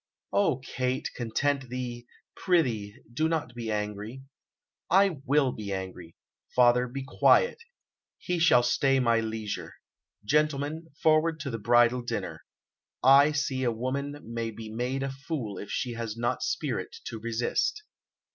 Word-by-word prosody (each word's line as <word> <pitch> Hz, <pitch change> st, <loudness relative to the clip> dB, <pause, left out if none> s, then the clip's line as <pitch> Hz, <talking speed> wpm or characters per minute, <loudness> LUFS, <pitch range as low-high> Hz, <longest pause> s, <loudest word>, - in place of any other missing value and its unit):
"O 190 Hz, -10 st, +3 dB
Kate, 130 Hz, -1 st, -2 dB
content 130 Hz, +3 st, -1 dB
thee; 120 Hz, -1 st, -5 dB, 0.3 s
prithee, 120 Hz, -, +1 dB, 0.2 s
do 155 Hz, +6 st, +1 dB
not 160 Hz, -7 st, -2 dB
be 120 Hz, -2 st, -5 dB
angry." 105 Hz, +4 st, -4 dB, 0.7 s
"I 190 Hz, -3 st, +4 dB
will 140 Hz, -1 st, +3 dB
be 105 Hz, -3 st, -6 dB
angry. 95 Hz, -3 st, -6 dB, 0.4 s
Father, 125 Hz, 0 st, +5 dB
be 135 Hz, +2 st, -5 dB
quiet; 470 Hz, -, +4 dB, 0.6 s
he 180 Hz, -1 st, -2 dB
shall 160 Hz, -8 st, +5 dB
stay 135 Hz, +2 st, +2 dB
my 115 Hz, -2 st, +3 dB
leisure. 110 Hz, -2 st, -4 dB, 0.5 s
Gentlemen, 150 Hz, +4 st, 0 dB, 0.2 s
forward 160 Hz, 0 st, +3 dB
to 140 Hz, -2 st, -4 dB
the 115 Hz, -, -4 dB
bridal 120 Hz, +3 st, +4 dB
dinner. 120 Hz, -, -4 dB, 0.6 s
I 140 Hz, +3 st, +7 dB
see 145 Hz, -3 st, -1 dB
a 120 Hz, -, +2 dB
woman 140 Hz, +5 st, -3 dB
may 115 Hz, 0 st, -3 dB
be 110 Hz, 0 st, -8 dB
made 125 Hz, +4 st, -2 dB
a 135 Hz, -, -2 dB
fool 135 Hz, -, -5 dB
if 100 Hz, -, -8 dB
she 125 Hz, -, -2 dB
has 115 Hz, -1 st, -5 dB
not 120 Hz, +2 st, -1 dB
spirit -, -, -2 dB
to 115 Hz, -, -5 dB
resist." 120 Hz, -, -1 dB
125 Hz, 140 wpm, -28 LUFS, 115-145 Hz, 0.7 s, I